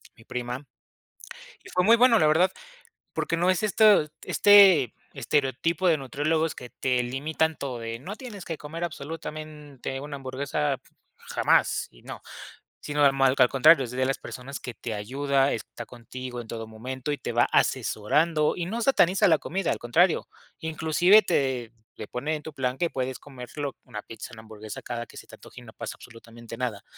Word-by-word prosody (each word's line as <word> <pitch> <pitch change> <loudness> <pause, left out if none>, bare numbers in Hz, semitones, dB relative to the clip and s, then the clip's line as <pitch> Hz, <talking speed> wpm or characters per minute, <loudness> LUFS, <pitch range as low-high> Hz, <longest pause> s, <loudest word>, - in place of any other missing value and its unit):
mi 115 - -18
prima, 125 +3 -5 1.0
y - - -13
fue 180 - +1
muy 225 +5 +7
bueno, 240 -2 +6
la 155 - +4
verdad, 165 +5 +4 0.6
porque - - -1
no 175 +2 +2
es 185 - 0
esto, 210 -5 +5 0.2
este 195 - +6 0.2
estereotipo 145 +6 0
de 165 -3 +4
nutriólogos 155 +4 -1
que 125 - -9
te 125 0 0
limitan 155 +5 -1
todo, 130 -4 -5
de: 115 0 -5
"No 185 +11 -7
tienes 215 -7 -9
que 165 - -4
comer 160 +3 -6
absolutamente 150 -4 -6
una 140 +1 -6
hamburguesa, 135 +2 -2 0.4
jamás", - - +1
y - - -20
no, - - -8 0.6
sino 145 0 0
al 135 - +5 0.3
al 125 - +6
contrario, 135 +2 +6
es 120 - -8
de 130 +1 0
las 135 +1 0
personas 135 +2 -8
que 125 - -7
te 115 0 -6
ayuda, 135 +6 0
está 120 +1 -7
contigo 125 +1 -8
en 115 - -12
todo 115 0 -6
momento 130 +5 -5
y 145 - -1
te - - -5
va - - +4
asesorando 150 +8 +2
y 175 - -3
no 230 +5 -3
sataniza 195 -8 +4
la 160 -3 +5
comida, 190 +2 -2
al - - -2
contrario, 165 +10 +2 0.3
inclusive 160 +5 +4
te 130 -7 0 0.3
le 110 - -7
pone 150 +5 -2
en 150 - -7
tu 160 - -8
plan 130 -1 -2
que 170 +2 0
puedes 130 -2 -3
comerte 130 +1 -9 0.2
una 110 -5 -7
pizza, 115 - -9
una 110 - -10
hamburguesa 110 -1 -9
cada 120 -1 -5
que - - -18
se - - -11
te - - -12
antoje - - -14
y - - -14
no - - -12
pasa - - -6
absolutamente 115 0 -12
nada. 120 -6 -3
140 Hz, 180 wpm, -26 LUFS, 125-160 Hz, 1.0 s, muy